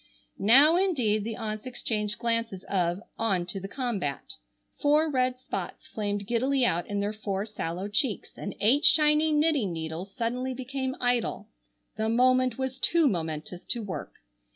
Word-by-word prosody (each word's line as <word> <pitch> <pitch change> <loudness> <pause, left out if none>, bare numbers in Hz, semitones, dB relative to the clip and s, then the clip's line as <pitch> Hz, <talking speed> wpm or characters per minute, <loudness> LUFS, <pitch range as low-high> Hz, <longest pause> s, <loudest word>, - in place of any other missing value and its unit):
Now 275 - +6
indeed 250 - +1
the 225 +1 -4
aunts 215 +1 -5
exchanged 215 -3 -2
glances 230 -5 -1
of 180 0 -1 0.2
"On 195 -6 +1
to 180 +2 -4
the 195 - -6
combat." 200 - -3 0.5
Four 300 +2 +3
red 255 -1 +1
spots 255 +1 -6
flamed 205 -1 -3
giddily 255 +4 +1
out 175 -6 0
in 205 0 -2
their 205 +1 -1
four 205 -2 -3
sallow 190 -3 -4
cheeks, 215 +2 -1
and 200 - -6
eight 260 +8 +4
shining 300 -1 +5
knitting 295 - +2
needles 165 +3 -5
suddenly 250 +3 -2
became 260 +1 -3
idle. 245 -1 0 0.5
The 220 0 0
moment 255 +1 +3
was 265 0 -3
too 335 +2 +3
momentous 165 - -3
to 235 -2 -1
work. 190 -3 -6
230 Hz, 155 wpm, -28 LUFS, 200-260 Hz, 0.5 s, Now